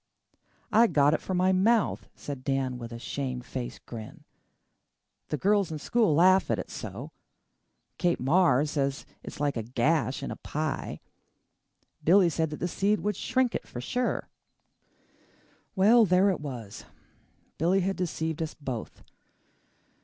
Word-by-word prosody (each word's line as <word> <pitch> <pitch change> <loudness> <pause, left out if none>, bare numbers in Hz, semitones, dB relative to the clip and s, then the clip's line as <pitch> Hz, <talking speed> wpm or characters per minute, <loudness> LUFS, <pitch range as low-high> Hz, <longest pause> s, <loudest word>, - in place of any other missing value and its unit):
"I 230 +2 +6
got 145 -5 +3
it - - 0
for 185 - -3
my 185 +1 +3
mouth," 210 +4 +2
said 140 -3 -7
Dan 135 -2 -1
with 115 -1 -7
a 115 - -6
shame 130 +1 -4
faced 125 -1 -7
grin. 110 -2 -9 1.0
"The 150 - -2
girls 200 +2 +2
in 155 - -3
school 210 +1 +2
laugh 185 +4 +5
at - - +1
it - - -6
so. - - -7 0.9
Kate 175 -1 +1
Marr 150 0 +3
says 140 -2 -2 0.2
it's - - -9
like 145 -1 0
a 115 - -1
gash 130 +4 0
in - - -4
a - - -6
pie. 155 -2 -4 1.0
Billy 180 +1 +5
said 160 0 0
that 150 +3 -3
seed 200 +4 0
would 210 0 -1
shrink 255 +4 0
it - - -4
for 120 - -7
sure." 245 - -2 1.5
Well, 220 +4 +6
there 185 +2 +4
it 185 - -3
was! 120 -8 -7 0.7
Billy 180 +5 +3
had 195 +2 -1
deceived 160 -3 -3
us 160 -1 -3
both. 130 -6 -6
160 Hz, 145 wpm, -28 LUFS, 135-190 Hz, 1.5 s, I